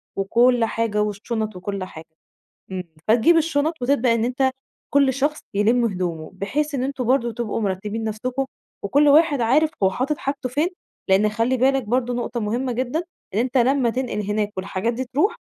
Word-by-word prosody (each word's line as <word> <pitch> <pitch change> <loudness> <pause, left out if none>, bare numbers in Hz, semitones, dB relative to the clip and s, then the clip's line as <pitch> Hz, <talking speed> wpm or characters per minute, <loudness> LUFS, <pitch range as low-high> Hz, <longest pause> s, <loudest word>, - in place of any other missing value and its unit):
وكلّ 235 +4 +3
حاجة 220 -2 -1
والشُّنَط 215 +1 -2
وكلّ 195 +1 -4
حاجة، 160 -3 -9 0.7
إمم، 185 -1 -4 0.2
فتجيب 240 +10 +5
الشُّنَط 320 0 +1
وتبدأ 245 -2 +3
إن 230 0 +1
أنت 260 +2 +1 0.4
كلّ 275 -2 +4
شخص 290 +3 -1
يلِم 230 +4 +3
هدومه 180 -6 -2
بحيث 285 +10 -2
إن 255 - -1
أنتم 265 -2 -2
برضه 240 -1 +2
تبقوا 225 -1 -3
مِرتّبين 210 +3 -2
نفسكم 250 +5 -2 0.4
وكلّ 285 +9 +3
واحد 295 -2 +5
عارف 295 +7 +3
هو 190 - +5
حاطط 275 +8 -1
حاجته 275 -2 -3
فين 295 +7 +1 0.4
لأن 195 +3 +4
خلّي 230 +4 0
بالك 265 +1 +2
برضه 245 +2 0
نقطة 240 0 -3
مهمة 240 +4 -1
جدًا 255 +7 -1 0.3
إن - - +1
أنت 255 +2 0
لما 255 -1 +3
تنقِل 250 -4 -2
هناك 210 0 0
والحاجات 190 +4 -2
دي 260 +3 -3
ترُوح 295 - 0
240 Hz, 170 wpm, -22 LUFS, 210-270 Hz, 0.7 s, فتجيب